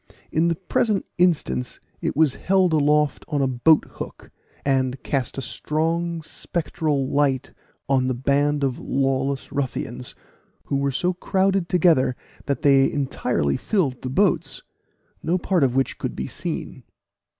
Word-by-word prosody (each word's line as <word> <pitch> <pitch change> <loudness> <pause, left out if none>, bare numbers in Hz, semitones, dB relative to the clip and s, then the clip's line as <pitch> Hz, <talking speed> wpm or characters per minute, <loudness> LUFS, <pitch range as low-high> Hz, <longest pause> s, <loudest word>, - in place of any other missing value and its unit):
In 160 +2 +2
the 170 - +1
present 195 +3 0
instance 145 - +1 0.2
it - - -2
was 155 -4 +4
held 185 0 +2
aloft 150 -1 +2
on 145 -3 0
a - - +2
boat 130 +5 +4
hook, - - -8 0.3
and 130 -1 0
cast 135 -3 -2
a 135 - -3
strong 165 +7 -1
spectral 155 -4 -2
light 135 -2 0 0.3
on 130 -2 +2
the 130 - 0
band 140 +3 +1
of 130 -2 0
lawless 135 0 -1
ruffians, 125 -3 -3 0.5
who 140 - -1
were 140 0 +1
so 175 +7 0
crowded 190 0 +1
together 160 -8 +3 0.3
that 140 +1 -1
they 135 -2 +5
entirely 125 - 0
filled 155 - 0
the 130 - -4
boats, 190 +8 +1 0.6
no 170 +3 +1
part 180 -2 +1
of 130 -2 +2
which 135 0 0
could - - -3
be 65 - -3
seen. - - -5
140 Hz, 145 wpm, -23 LUFS, 130-165 Hz, 0.6 s, they